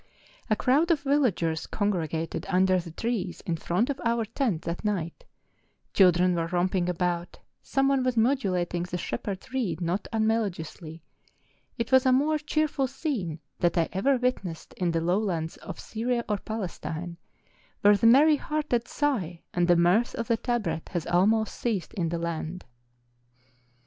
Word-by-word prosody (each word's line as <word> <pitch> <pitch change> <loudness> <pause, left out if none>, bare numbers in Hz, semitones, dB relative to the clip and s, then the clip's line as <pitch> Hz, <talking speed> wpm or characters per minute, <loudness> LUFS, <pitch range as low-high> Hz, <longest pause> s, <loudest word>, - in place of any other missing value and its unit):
A 215 - +4
crowd 280 +9 +2
of 325 -4 +3
villagers 240 - +1
congregated 165 -6 -2
under 185 0 +3
the 170 -1 -7
trees 195 0 -3
in 170 - -2
front 175 +8 0
of 280 -1 -3
our 230 -1 +1
tent 225 - -1
that 170 +1 -4
night: 185 -6 -2 0.7
children 180 -1 +5
were 165 -1 -1
romping 180 +1 0
about, 175 0 -2 0.2
some 270 0 +1
one 275 -1 +3
was 255 -2 0
modulating 190 -8 +1
the 180 0 -3
shep¬ - - -5
herd's 200 +6 -5
reed 205 -12 -1
not 175 +3 -2
unmelodiously, 185 -8 -2 0.7
it 230 0 -3
was 260 0 +5
a - - +5
more 295 +4 +3
cheer¬ 310 +1 +1
ful 270 -2 -1
scene 240 - -3 0.2
than 175 - +2
I 165 -2 +2
ever 265 +8 +2
witnessed 220 -10 -3
in 180 -2 -1
the 165 -1 0
lowlands 175 -2 -1
of - - -8
Syria 235 +1 -2
or 210 -1 0
Palestine, 175 -5 -5 0.6
where 205 0 +6
the 205 +3 +3
merry 295 +6 +6
hearted 295 -6 -1
sigh 200 - -1
and 175 -1 +2
the 175 - +5
mirth 180 +8 +3
of 230 - -3
the 230 - +2
tabret 210 -11 -2
has 175 -3 -2
almost 215 +5 +2
ceased 215 -7 -2
in 175 -6 -1
the 170 - -2
land. 170 +1 -4
195 Hz, 160 wpm, -27 LUFS, 175-245 Hz, 0.7 s, where